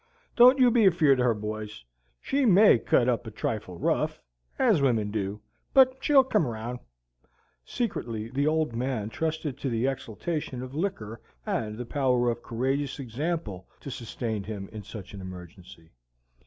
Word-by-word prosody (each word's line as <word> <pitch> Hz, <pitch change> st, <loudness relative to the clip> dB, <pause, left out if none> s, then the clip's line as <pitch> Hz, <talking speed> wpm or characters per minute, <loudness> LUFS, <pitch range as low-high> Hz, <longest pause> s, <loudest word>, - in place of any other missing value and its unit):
Don't 250 Hz, +2 st, +8 dB
you 250 Hz, -2 st, +5 dB
be 225 Hz, -4 st, +5 dB
afeard 155 Hz, -7 st, +4 dB
o' -, -, +3 dB
her, 120 Hz, -2 st, +3 dB
boys. 105 Hz, -3 st, -6 dB, 0.4 s
She 280 Hz, +1 st, 0 dB
MAY 205 Hz, -, +6 dB
cut 120 Hz, -, +2 dB
up 120 Hz, -2 st, 0 dB
a -, -, -3 dB
trifle 105 Hz, -4 st, -4 dB
rough, -, -, 0 dB, 0.4 s
ez -, -, +3 dB
wimmin 115 Hz, -6 st, +1 dB
do, 105 Hz, -1 st, -3 dB, 0.3 s
but 260 Hz, -1 st, +6 dB
she'll 280 Hz, -2 st, +6 dB
come 215 Hz, -, +1 dB
round." 120 Hz, +2 st, -5 dB, 0.8 s
Secretly 115 Hz, -, -3 dB
the 140 Hz, +2 st, 0 dB
Old 155 Hz, -6 st, 0 dB
Man 120 Hz, -3 st, -2 dB
trusted 155 Hz, 0 st, -3 dB
to 135 Hz, -, -2 dB
the 115 Hz, +1 st, 0 dB
exaltation 135 Hz, +1 st, -3 dB
of 130 Hz, 0 st, -9 dB
liquor 115 Hz, -, -4 dB, 0.2 s
and 110 Hz, -1 st, -2 dB
the 125 Hz, -, -5 dB
power 125 Hz, -2 st, +1 dB
of 120 Hz, 0 st, -6 dB
courageous 135 Hz, +5 st, -2 dB
example 135 Hz, -, -4 dB
to 140 Hz, -, -7 dB
sustain 115 Hz, -3 st, -4 dB
him 100 Hz, -3 st, -6 dB
in 110 Hz, -1 st, -8 dB
such 105 Hz, -1 st, -10 dB
an 100 Hz, -, -8 dB
emergency. 90 Hz, -2 st, -11 dB
125 Hz, 160 wpm, -27 LUFS, 110-155 Hz, 0.8 s, Don't